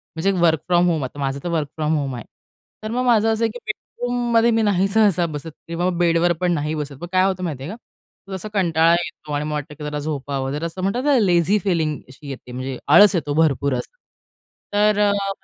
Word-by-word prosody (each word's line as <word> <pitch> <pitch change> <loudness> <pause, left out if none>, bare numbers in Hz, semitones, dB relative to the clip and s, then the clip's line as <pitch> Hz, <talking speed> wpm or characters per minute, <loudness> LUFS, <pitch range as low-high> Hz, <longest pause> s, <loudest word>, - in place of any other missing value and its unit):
म्हणजे 165 +5 +1
work 160 -2 +4
from 175 0 +3
home, 160 -5 0
आता 130 +3 -7
माझं 135 0 -2
तर 175 - -3
वर्क 160 -3 -1
फ्रॉम 155 0 0
होम, 135 -3 -3
आहे, 120 - -8 0.6
तर 215 - -4
मग 250 +2 -1
माझं 225 -2 +4
असं 220 +1 -1
आहे, 225 - +2
की 245 - -9
बेडरूममध्ये 235 +1 0
मी 225 0 +2
नाही 195 -3 +2
सहसा 200 -4 +3
बसत 155 -1 -6 0.2
किंवा 170 +2 -1
बेडवरपण 175 +1 +2
नाही 150 0 -1
बसत. 150 -2 -5
मग 175 - -5
काय 185 0 +4
होतं 190 -1 -1
माहिती 150 -7 -4
आहे 160 - -5
का, 205 -3 -15
जसा 190 +3 -5
कंटाळा 165 -4 +3
येतो 170 -3 -3
आणि 145 +1 -1
मला 150 - -3
वाटतं, 150 0 -4
की - - -7
जरा 150 0 -3
झोपावं, 140 -2 -3
जरा 150 +4 -3
असं 170 +3 -5
म्हणतात 200 +7 -1
ना 290 -2 +4
लेझी 180 -1 +3
फीलिंग 160 -6 0
अशी 140 +2 -12
येते, 130 -2 -8
म्हणजे 130 +1 -5
आळस 195 +7 +7
येतो 145 -4 -1
भरपूर 140 -3 +2
असं. 130 - -5 0.8
तर 210 +1 +3
मला 200 -1 +2
170 Hz, 220 wpm, -21 LUFS, 150-200 Hz, 0.8 s, आळस